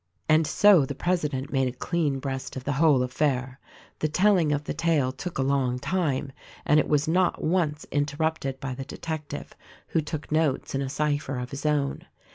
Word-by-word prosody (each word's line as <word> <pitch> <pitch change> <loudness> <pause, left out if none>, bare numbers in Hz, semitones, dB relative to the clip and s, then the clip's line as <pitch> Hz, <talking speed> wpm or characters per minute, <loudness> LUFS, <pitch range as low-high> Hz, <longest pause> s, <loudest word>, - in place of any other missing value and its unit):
And 155 0 +4
so 195 0 +6
the 135 +1 -4
president 150 -6 -1
made 135 -1 +2
a - - -1
clean 160 -6 0
breast 135 -1 -5
of 130 - -5
the 140 - -1
whole 140 -2 +4
affair. 130 0 -1 0.4
The 155 - +1
telling 180 -1 +3
of 145 0 0
the - - -3
tale 160 -6 +1
took 165 +7 -6
a 135 - +1
long 135 -2 +1
time 145 -3 -1 0.3
and 150 +1 +5
it - - +1
was 150 -1 +2
not 180 +2 +1
once 155 -3 0
interrupted 145 -1 -1
by 135 -1 -4
the 135 +1 -6
detective, 155 +1 -6 0.4
who 160 - +1
took 155 0 -6
notes 155 -3 +1
in 135 - 0
a 135 - -2
cypher 145 -2 -1
of 125 0 -5
his 140 +2 -3
own. 145 -2 -1
145 Hz, 190 wpm, -26 LUFS, 135-160 Hz, 0.4 s, so